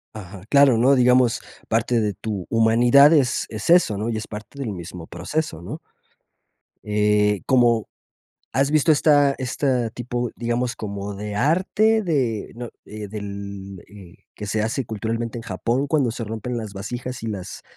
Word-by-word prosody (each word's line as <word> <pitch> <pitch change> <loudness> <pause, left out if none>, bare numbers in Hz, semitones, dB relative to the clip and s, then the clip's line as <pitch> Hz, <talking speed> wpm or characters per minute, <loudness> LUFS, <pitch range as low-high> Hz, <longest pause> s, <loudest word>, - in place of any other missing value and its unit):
Ajá, 100 -2 -9
claro, 140 -4 +5
¿no? 135 +4 +5
Digamos, 125 -1 +4 0.3
parte 115 +1 +1
de 105 -2 0
tu 100 -3 -5
humanidad 120 +6 +5
es 130 -4 +2
es 110 +4 -5
eso, 170 - +5
¿no? 110 +3 -2
Y 110 - -2
es 110 - -6
parte 110 +6 -9
del 130 -6 -3
mismo 85 -2 -8
proceso, 90 - -4
¿no? 85 - -7 1.0
Eh, 105 -1 +2
como 120 -4 +3 0.6
has 140 +1 +2
visto 155 +1 +3
esta 145 -2 +4
esta 130 -2 -1
tipo, 120 0 -3
digamos, 120 +1 -1
como 100 -2 -5
de 105 +1 -6
arte, 190 - +2
de 130 - -1
¿no? 120 0 -7 0.2
Eh, 105 -1 -7
del, 100 -2 -7
eh, 95 -4 -14 0.2
que 105 - -7
se 105 +1 -1
hace 115 +3 -2
culturalmente 115 +2 -3
en 115 - -6
Japón 115 +7 -1
cuando 140 -4 +1
se 115 0 -5
rompen 115 +3 -4
las 110 -3 -5
vasijas 120 +5 -6
y 115 - -4
las, 100 -4 -6
115 Hz, 160 wpm, -22 LUFS, 105-130 Hz, 1.0 s, claro